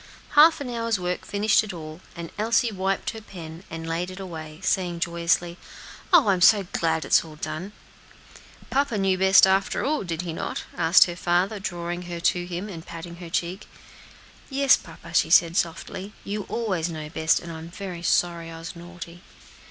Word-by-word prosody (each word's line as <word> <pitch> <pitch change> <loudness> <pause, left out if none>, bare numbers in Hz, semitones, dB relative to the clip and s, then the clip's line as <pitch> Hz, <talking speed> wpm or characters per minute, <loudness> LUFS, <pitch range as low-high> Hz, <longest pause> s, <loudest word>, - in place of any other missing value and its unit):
Half 315 +2 +7
an 280 - -4
hour's 230 -3 -1
work 180 0 -3
finished 210 +1 +3
it 210 -3 -6
all, 155 0 -8
and 170 -1 -7
Elsie 230 +2 +2
wiped 195 -1 -1
her 220 - -9
pen, 170 -4 -10
and 165 0 -6
laid 170 +2 -2
it 185 +1 -9
away, 160 -4 -8
saying 175 -3 0
joyously, 170 0 0 0.5
"Oh! 320 - +6
I'm 185 -2 +2
so 205 +1 +7
glad 160 -1 0
it - - -9
is - - +5
all 160 -2 -11
done." 155 +6 -5 1.0
"Papa 275 -4 +1
knew 195 -1 +2
best, 190 +1 +6
after 190 +1 +1
all, 295 -4 0
did 170 -1 -3
he 170 -2 -4
not?" - - -4
asked 165 +3 +6
her 175 - -5
father, 180 +4 +1
drawing 175 -1 -4
her 170 -1 -4
to 175 +1 +1
him, 180 +3 -4
and 170 -6 -8
patting 170 +1 -9
her 175 -1 -9
cheek. 180 +5 -2 0.8
"Yes, 275 -1 +5
papa," - - -12
she - - +3
said 170 -1 +5
softly; 185 +4 -2
"you 205 0 -4
always 185 -8 -1
know 155 -2 -6
best, 160 +1 +1
and 170 - -8
I 160 - -7
am 165 +1 -9
very 180 -1 -7
sorry 170 -1 +1
I 165 - -8
was 165 +1 -8
naughty." 175 0 -10
175 Hz, 190 wpm, -25 LUFS, 170-200 Hz, 1.0 s, Half